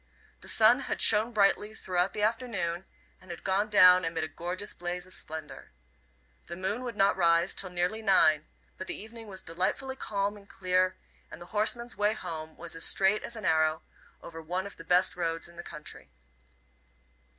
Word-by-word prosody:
The - - -13
sun 225 +4 +5
had 275 - -3
shone 220 +2 +5
brightly 210 0 +2
throughout 180 -1 -1
the 210 - -3
afternoon, 210 -6 -1 0.4
and 185 - -17
had 175 - -8
gone 195 +3 +1
down 185 -3 +7
amid 165 -1 -2
a - - 0
gorgeous 175 +6 -3
blaze 175 0 -5
of 185 - -15
splendour. 155 -2 -7 0.8
The 170 - -6
moon 190 +6 -2
would 240 -3 -5
not 200 -1 +3
rise 170 0 +3
till 190 - -1
nearly 180 +5 -1
nine, 155 -7 +4 0.3
but 185 - -6
the - - -5
evening 225 +1 -11
was 190 -2 -7
delightfully 185 +10 -2
calm 205 -4 -2
and 200 0 -17
clear, 185 0 0 0.3
and - - -10
the 175 - -10
horseman's 235 +3 +1
way 210 +1 +2
home 160 -1 -7
was 170 - -7
as 165 - -3
straight 195 +2 +2
as 235 - -4
an 220 - -7
arrow, 155 0 +2 0.4
over 165 -1 -9
one 180 +4 -3
of 200 - -8
the - - -10
best 180 +2 +2
roads 165 -2 -2
in 170 - -16
the 170 - -7
country. 150 -3 -10
185 Hz, 185 wpm, -29 LUFS, 170-210 Hz, 0.8 s, down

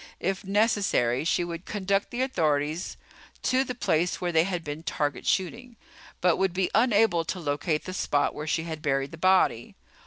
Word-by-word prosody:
If 190 +2 -2
necessary, 195 - +1
she 175 - +1
would 170 0 -6
conduct 200 -1 -1
the 245 +2 -1
authorities 155 - -1 0.5
to 260 +1 +2
the 250 -2 -5
place 175 -6 0
where 175 -1 -1
they 165 0 +3
had 180 -3 -3
been 150 +1 -5
target 145 -4 -2
shooting, 230 +6 -1 0.5
but 180 -2 +3
would 190 -1 0
be 185 -1 0
unable 220 -7 +3
to 185 - -3
locate 150 0 -1
the 185 - -5
spot 145 -5 0
where 150 +1 -6
she 160 0 0
had 160 -2 -6
buried 135 -1 0
the 165 - -9
body. 185 -10 +2
175 Hz, 180 wpm, -27 LUFS, 155-195 Hz, 0.5 s, they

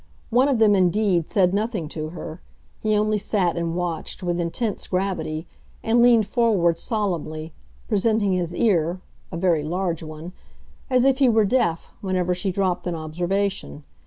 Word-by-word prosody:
One 250 +4 +4
of 275 -4 +2
them, 220 -2 +5
indeed, 185 -2 +2
said 185 -3 +3
nothing 210 -5 -1
to 155 0 -5
her; 160 0 -8 0.4
he 215 -1 +1
only 215 0 +1
sat 195 -4 0
and 170 -1 -2
watched 175 0 -4
with 175 -1 -1
intense 195 +6 -2
gravity, 180 -4 -2 0.4
and 230 +2 +3
leaned 235 -3 +5
forward 195 -9 +2
solemnly, 165 -8 -2 0.3
presenting 215 -2 +1
his 175 -1 -2
ear 180 -5 +1 0.3
(a 170 - -4
very 170 -3 +2
large 170 +2 -2
one), 155 +2 -8 0.6
as 255 -1 +3
if 270 0 +3
he 265 -3 +5
were 220 -2 +4
deaf, 190 -7 0
whenever 185 -2 0
she 185 +2 -2
dropped 185 -1 -1
an 175 - -2
observation. 175 +2 -2
185 Hz, 160 wpm, -23 LUFS, 170-215 Hz, 0.6 s, them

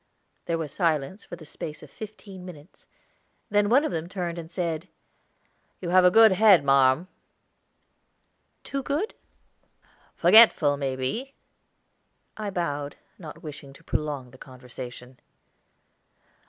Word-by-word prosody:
There 170 - -1
was 155 -3 -5
silence 160 +3 -1
for - - -8
the 165 -2 -13
space 150 +1 -8
of 145 - -14
fifteen 205 -3 -10
minutes, 170 -3 -13 0.6
then 205 0 +2
one 270 +6 +4
of - - -2
them 165 0 -4
turned 175 -3 -4
and 165 -1 -9
said: 170 -1 -3 0.9
"You 175 - -5
have 185 0 +6
a 180 - +7
good 220 +3 +7
head, 190 -4 +6
marm." 135 +4 +3 1.6
"Too 275 - -4
good?" 300 - -2 1.0
"Forgetful, 195 -10 +6
may 135 -2 -3
be." 225 - -4 1.0
I 215 -1 -4
bowed, 145 -6 -3 0.2
not 155 -5 -11
wishing 145 -3 -9
to - - -18
prolong 145 -5 -3
the 130 - -17
conversation. 125 -1 -11
165 Hz, 125 wpm, -26 LUFS, 140-195 Hz, 1.6 s, a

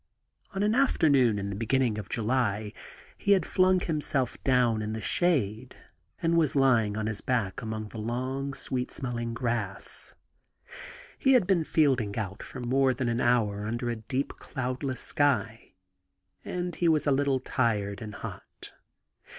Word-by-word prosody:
On 195 - 0
an 210 +1 +2
afternoon 145 - +3
in 100 0 -3
the - - -4
beginning 115 0 +1
of 100 - -8
July 110 -3 0 0.5
he 200 - +4
had 190 -5 +2
flung 185 0 +3
himself 150 -7 -1
down 125 -4 +3
in 110 0 -3
the 110 - -3
shade, 125 - 0 0.5
and 165 0 +2
was 155 -4 +2
lymg 120 -6 +3
on 110 - -2
his 110 -2 -3
back 115 -7 -1
among 110 -1 -5
the 110 - -8
long, 130 +5 -3
sweet 125 -1 -3
smelling 120 -2 -4
grass. 115 -5 -1 1.0
He 270 - +4
had 245 -7 +5
been 175 -3 +2
fielding 130 -11 +1
out 100 -3 -4
for - - -7
more 130 +1 +2
than 125 -1 -1
an 120 +1 0
hour 105 -4 +1
under 120 +2 -2
a - - -2
deep, 130 +5 -3
cloudless 130 0 -4
sky, 140 -6 0 0.7
and 180 0 -3
he 170 +1 +1
was 155 -2 +2
a 145 - +3
little 135 -1 +2
tired 110 -6 -1
and 105 -2 -7
hot. - - -9
125 Hz, 160 wpm, -28 LUFS, 110-140 Hz, 1.0 s, had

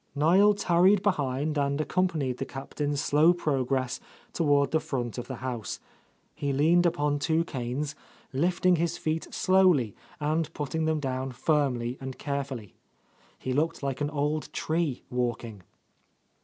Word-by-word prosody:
Niel 185 +8 +5
tarried 190 +1 +4
behind 145 -5 0
and 140 +1 0
accompanied 155 -5 0
the 135 - -2
Cap 135 +1 -9
tain's 145 -1 -1
slow 155 +5 +4
progress 130 -5 -1 0.3
toward 145 -3 +2
the 160 - +3
front 125 -5 -3
of 120 - -6
the 130 - -5
house. 120 -5 -4 0.5
He 140 - -2
leaned 165 +6 +4
upon 145 -3 0
two 160 +2 +1
canes, 135 +1 -3 0.4
lifting 175 +5 +2
his 170 0 -1
feet 160 +1 -2
slowly 185 - +3 0.3
and 155 +1 0
putting 160 +2 -2
them 160 -1 +1
down 130 -1 -3
firmly 125 -4 0
and 130 -1 -6
carefully. 140 -7 -4 0.6
He 130 - -3
looked 150 +2 0
like 135 0 -2
an 145 - 0
old 150 +1 -1
tree 160 -5 -1
walking. 120 -4 -2
145 Hz, 140 wpm, -28 LUFS, 130-160 Hz, 0.6 s, Niel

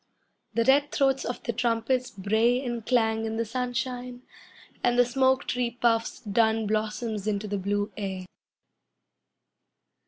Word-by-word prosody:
The 230 - +3
red 285 +3 +4
throats 270 -1 +2
of 245 - -4
the 235 - -2
trumpets 240 +2 0
bray 220 +5 +2
and 240 -2 -3
clang 225 -2 +1
in 220 0 -3
the 230 - 0
sunshine, 250 +1 -3 0.6
And 245 0 +2
the 245 - +6
smoke 260 +2 +2
tree 245 -1 -1
puffs 230 +1 +1
dun 220 0 +2
blossoms 215 0 -2
into 210 0 -1
the 205 -1 -2
blue 205 +2 -1
air. 190 -3 -4
230 Hz, 135 wpm, -27 LUFS, 215-250 Hz, 0.6 s, the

